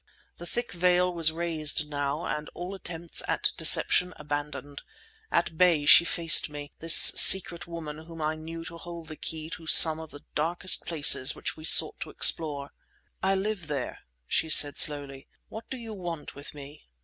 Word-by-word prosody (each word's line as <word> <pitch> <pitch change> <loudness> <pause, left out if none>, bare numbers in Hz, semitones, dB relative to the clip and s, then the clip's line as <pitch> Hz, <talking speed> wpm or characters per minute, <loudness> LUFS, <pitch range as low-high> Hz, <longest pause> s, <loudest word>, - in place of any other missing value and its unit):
The 175 - -11
thick 240 +6 -6
veil 180 +1 0
was 165 -2 +2
raised 160 -3 -3
now 145 +1 -5
and 150 0 -6
all 180 +2 -8
attempts 170 -3 -6
at - - -2
deception 180 -1 +2
abandoned. 145 -1 -8 0.5
At 160 - -3
bay 170 -5 +1
she 170 - +6
faced 165 -2 +2
me, 145 -1 -11
this 165 0 +3
secret 175 -3 +6
woman 160 -3 -9
whom 165 0 -13
I 155 0 -3
knew 165 +1 -10
to 170 - -11
hold 170 -1 -11
the 155 - -9
key 160 +1 -8
to 160 - -11
some 160 0 +4
of 160 -1 -11
the 145 0 -15
darkest 170 +5 +1
places 145 -5 +2
which - - -6
we 155 - -13
sought - - +5
to - - -8
explore. 145 -3 0 0.5
"I 195 +1 -1
live 195 -3 -5
there," 140 -4 -6 0.3
she 160 - -3
said 145 -2 +4
slowly. 140 -2 -2 0.2
"What 220 +1 -12
do 260 - -8
you 230 -2 -11
want 175 -6 -9
with 140 +1 -13
me?" 145 +1 -15
160 Hz, 175 wpm, -25 LUFS, 150-175 Hz, 0.5 s, she